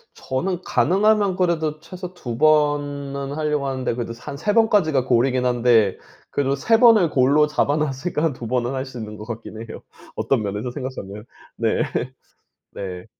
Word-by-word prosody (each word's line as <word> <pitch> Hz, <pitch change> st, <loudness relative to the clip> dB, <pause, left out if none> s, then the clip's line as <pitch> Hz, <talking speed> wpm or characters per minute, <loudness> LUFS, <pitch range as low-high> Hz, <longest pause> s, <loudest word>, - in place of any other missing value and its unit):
저는 175 Hz, +7 st, -3 dB
가능하면 200 Hz, +1 st, +2 dB
그래도 160 Hz, -4 st, 0 dB
최소 180 Hz, +2 st, -8 dB
2 120 Hz, -9 st, -6 dB
번은 145 Hz, -2 st, +1 dB
하려고 150 Hz, -2 st, -1 dB
하는데 130 Hz, -3 st, -2 dB
그래도 115 Hz, -1 st, -4 dB
한 140 Hz, -1 st, -7 dB
3 205 Hz, +7 st, 0 dB
번까지가 200 Hz, -, +3 dB
goal 120 Hz, 0 st, +4 dB
이긴 125 Hz, -1 st, 0 dB
한데 120 Hz, -5 st, +3 dB, 0.3 s
그래도 140 Hz, -1 st, 0 dB
3 225 Hz, +11 st, +2 dB
번을 225 Hz, -9 st, +6 dB
goal로 140 Hz, +3 st, +4 dB
잡아 150 Hz, -1 st, +1 dB
놨으니까 150 Hz, +2 st, -2 dB
한 160 Hz, -4 st, +1 dB
2 120 Hz, -2 st, -7 dB
번은 125 Hz, +1 st, 0 dB
할 130 Hz, +1 st, -3 dB
수 130 Hz, -2 st, -10 dB
있는 105 Hz, -1 st, -7 dB
것 105 Hz, -, -9 dB
같긴 110 Hz, -1 st, -7 dB
해요 115 Hz, -1 st, -9 dB, 0.3 s
어떤 130 Hz, -5 st, 0 dB
면에서 105 Hz, +4 st, -3 dB
생각하면. 120 Hz, -6 st, -7 dB, 0.3 s
네. 115 Hz, +5 st, +1 dB, 0.9 s
네. 90 Hz, -2 st, -6 dB
140 Hz, 335 characters per minute, -22 LUFS, 120-160 Hz, 0.9 s, 번을